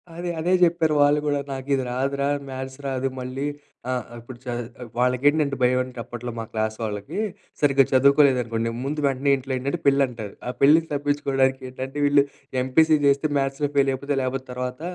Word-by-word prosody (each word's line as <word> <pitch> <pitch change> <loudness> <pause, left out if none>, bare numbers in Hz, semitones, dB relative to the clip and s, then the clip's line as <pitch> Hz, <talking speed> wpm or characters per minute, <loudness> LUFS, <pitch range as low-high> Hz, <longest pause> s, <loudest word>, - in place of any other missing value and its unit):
అదే. 175 +1 -4
అదే 170 +3 0
జేప్పారు 165 -3 +3
వాళ్ళు 145 +1 +4
గూడా 145 -1 +1
నాకిది 135 0 -1
రాదురా! 140 +2 -1 0.2
మ్యాథ్స్ 130 +1 -6
రాదు 135 0 -1
మళ్ళీ 130 +3 -3 0.4
ఆహ్, 125 -3 -2
ఇప్పుడు 120 +2 -11
చే 125 - -4 0.5
వాళ్ళకేంటంటే 140 +4 +2
భయమంటే 125 0 +1
అప్పట్లో 120 +1 -6
మా 115 - -3
క్లాస్ 110 0 -1
వాళ్ళకి, 105 - -4 0.4
సరిగ్గా 140 -2 +4
చదువుకోలేదనుకోండి 130 -4 +3 0.2
ముందు 150 +2 -2
వెంటనే 135 0 +1
ఇంట్లో 135 0 -7
ఏంటంటే 140 +6 -2
పెళ్లంటారు. 125 -7 +1
ఆ - - -1
పెళ్ళికి 160 +4 +5
తప్పించుకోవడానికేంటంటే 135 -2 -1
వీళ్ళు 145 0 +5 0.4
ఎంపీసీ 155 +5 +4
జేస్తే 140 +2 +3
మ్యాథ్స్‌లో 135 +1 0
ఫెయిల్ 140 -1 +4
అయిపోతే 140 +2 -2
లేకపోతే 130 0 -3
తర్వాత 125 +2 -5
135 Hz, 150 wpm, -24 LUFS, 125-145 Hz, 0.5 s, పెళ్ళికి